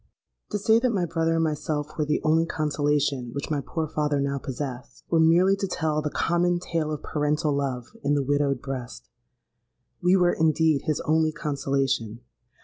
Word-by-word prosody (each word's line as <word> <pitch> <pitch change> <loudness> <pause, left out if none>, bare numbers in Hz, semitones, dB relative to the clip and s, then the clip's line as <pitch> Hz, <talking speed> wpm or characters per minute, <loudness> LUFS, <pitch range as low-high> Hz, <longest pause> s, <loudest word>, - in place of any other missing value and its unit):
"To 210 - -1
say 220 +3 +4
that 250 +1 +1
my 185 -4 +1
brother 165 0 0
and 165 - +2
myself 150 -1 -2
were 155 - 0
the 150 0 0
only 160 +1 +3
consolation 145 -5 0
which 140 +2 -4
my 145 -2 0
poor 160 +3 -3
father 150 -1 0
now 140 0 -1
possessed, 130 -1 -6
were 165 - +4
merely 175 +4 +5
to 195 - -2
tell 155 -4 -1
the 150 - -2
common 175 +3 +1
tale 165 -3 -2
of 150 -1 -5
parental 150 0 0
love 135 - -3
in 145 - +2
the 140 - +1
widowed 140 -1 0
breast. 125 - -7 0.9
We 180 +2 +4
were 180 -2 +3
indeed 160 -2 +2
his 155 - 0
only 160 0 +2
consolation! 135 -7 -2
150 Hz, 175 wpm, -25 LUFS, 140-165 Hz, 0.9 s, merely